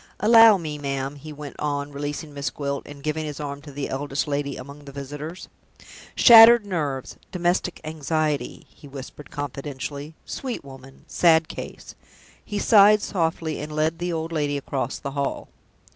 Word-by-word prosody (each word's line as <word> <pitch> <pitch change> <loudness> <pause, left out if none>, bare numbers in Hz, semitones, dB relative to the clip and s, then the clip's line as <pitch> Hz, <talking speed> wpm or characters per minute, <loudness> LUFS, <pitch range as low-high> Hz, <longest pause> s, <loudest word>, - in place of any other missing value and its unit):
Allow 225 -1 +8
me, 155 -4 -5
ma'am," 135 0 -3
he 150 +2 -10
went 145 -1 -9
on, 145 -1 -2
releasing 145 +1 -5
Miss 140 0 -2
Gwilt, 140 -1 -3
and 140 -1 -11
giving 155 +1 -2
his 150 -2 -6
arm 140 -1 -5
to 145 -1 -11
the 140 0 -4
eldest 140 +2 -2
lady 140 -1 -2
among 140 +3 -11
the 140 - -9
visitors. 145 +5 -7 0.7
"Shattered 230 -1 +9
nerves 150 -9 -3
domestic 180 0 0
anxiety," 155 -1 -2
he 145 - -15
whispered, 140 +1 -10
confidentially. 145 +1 -6
"Sweet 255 - -5
woman! 135 0 -13
sad 165 -2 +4
case!" - - -8 0.5
He 205 - -5
sighed 210 0 +6
softly, 165 -3 -1
and 150 +1 -6
led 155 +2 0
the 175 0 -2
old 165 0 -3
lady 145 -3 -1
across 135 -2 -3
the 140 - -6
hall. 140 0 -3
150 Hz, 160 wpm, -24 LUFS, 140-165 Hz, 0.7 s, Shattered